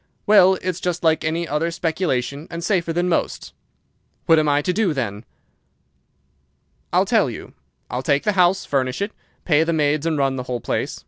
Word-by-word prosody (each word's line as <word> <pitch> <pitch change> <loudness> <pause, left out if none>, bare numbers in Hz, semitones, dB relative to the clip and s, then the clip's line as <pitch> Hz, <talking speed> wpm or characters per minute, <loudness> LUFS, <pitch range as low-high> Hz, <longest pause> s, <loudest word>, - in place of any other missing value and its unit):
"'Well, 190 -2 +6
it's 185 -1 -2
just 175 -1 -3
like 160 -1 +2
any 165 +2 -1
other 155 +3 -1
speculation, 160 -5 -2
and 170 0 -6
safer 170 -3 0
than 175 +2 0
most.' 175 - -2 0.7
"'What 165 -1 +5
am 155 -1 +1
I 145 0 +2
to 180 - 0
do, 190 -5 0
then?' 110 -4 -4 1.7
"'I'll - - +3
tell - - +2
you. - - -9 0.3
I'll 125 - -3
take 140 +1 +1
the 210 - +2
house, 185 -1 +2
furnish 130 -2 -1
it, 200 +2 -2 0.3
pay 155 -2 +3
the 165 +1 -1
maids, 150 0 +1
and 160 -2 0
run 135 -1 0
the 125 - -3
whole 125 -1 -2
place. - - -3
160 Hz, 185 wpm, -21 LUFS, 145-175 Hz, 1.7 s, Well